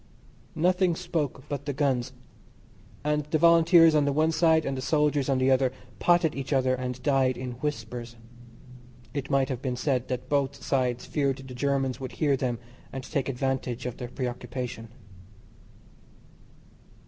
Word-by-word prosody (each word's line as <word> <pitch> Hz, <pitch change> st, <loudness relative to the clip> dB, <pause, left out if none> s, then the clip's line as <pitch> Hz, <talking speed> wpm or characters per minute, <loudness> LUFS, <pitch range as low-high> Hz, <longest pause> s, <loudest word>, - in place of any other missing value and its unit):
Nothing 180 Hz, +1 st, +2 dB
spoke 160 Hz, -7 st, -3 dB
but 140 Hz, -1 st, -5 dB
the 145 Hz, -, -1 dB
guns; 130 Hz, -4 st, 0 dB, 0.9 s
and 150 Hz, 0 st, +1 dB
the 155 Hz, +1 st, 0 dB
Volunteers 165 Hz, 0 st, +6 dB
on 150 Hz, -1 st, +4 dB
the 140 Hz, -, +2 dB
one 155 Hz, +3 st, +2 dB
side 160 Hz, -1 st, +3 dB
and 135 Hz, -, -1 dB
the 130 Hz, -, -4 dB
soldiers 150 Hz, -1 st, +1 dB
on 135 Hz, -, +2 dB
the 130 Hz, +1 st, +3 dB
other 130 Hz, -1 st, +3 dB, 0.3 s
potted 175 Hz, -3 st, +3 dB
each 135 Hz, +1 st, -5 dB
other 130 Hz, -2 st, +2 dB
and 125 Hz, 0 st, -3 dB
died 130 Hz, -2 st, +2 dB
in 125 Hz, 0 st, -5 dB
whispers; 120 Hz, -4 st, -4 dB, 1.0 s
it 140 Hz, -1 st, -4 dB
might 135 Hz, -2 st, +2 dB
have 130 Hz, -2 st, -3 dB
been 130 Hz, -3 st, -2 dB
said 130 Hz, -1 st, -1 dB
that 125 Hz, 0 st, -4 dB
both 140 Hz, 0 st, 0 dB
sides 125 Hz, -3 st, 0 dB
feared 140 Hz, -3 st, 0 dB
the 135 Hz, -1 st, -10 dB
Germans 135 Hz, -1 st, 0 dB
would 130 Hz, -1 st, -6 dB
hear 145 Hz, -3 st, +2 dB
them 125 Hz, -3 st, -1 dB, 0.3 s
and 135 Hz, -1 st, -6 dB
take 135 Hz, 0 st, -2 dB
advantage 130 Hz, -2 st, -2 dB
of 125 Hz, -, -4 dB
their 125 Hz, -2 st, -6 dB
preoccupation. 125 Hz, -2 st, -5 dB
135 Hz, 160 wpm, -27 LUFS, 125-150 Hz, 1.0 s, Volunteers